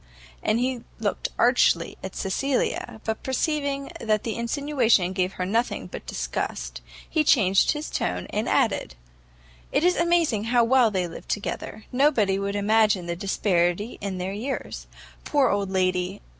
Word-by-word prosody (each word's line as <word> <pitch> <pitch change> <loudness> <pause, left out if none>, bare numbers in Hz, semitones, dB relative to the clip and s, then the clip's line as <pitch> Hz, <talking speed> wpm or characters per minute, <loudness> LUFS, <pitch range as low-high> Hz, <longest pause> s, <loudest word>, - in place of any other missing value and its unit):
And 215 - +1
he 250 -1 -1 0.2
looked 210 -2 -1
archly 235 -8 +3
at 190 - -7
Cecilia: 240 +1 -1
but 220 0 -3
perceiving 280 0 -1
that 215 -2 +1
the 225 - -3
insinuation 235 -6 +1
gave 185 0 0
her 180 - -3
nothing 230 +6 -1
but - - -9
disgust, - - -4 0.3
he 315 - +1
changed 195 -10 +4
his 300 +1 -5
tone, 90 0 -2
and - - -1
added, - - +1 0.8
"It - - +1
is 360 +1 +4
amazing 335 -11 +2
how 240 +1 +3
well 250 0 +4
they 185 -4 -1
live 165 - -10
together; 210 +1 -4
nobody 245 -8 +3
would 200 0 -2
imagine 205 -2 +3
the 170 0 -3
disparity 185 +2 0
in 195 -2 -3
their 185 +2 -3
years. 245 +7 -5 0.4
Poor 280 -4 +2
old 200 -1 0
lady! 185 0 0
215 Hz, 150 wpm, -25 LUFS, 190-260 Hz, 0.8 s, changed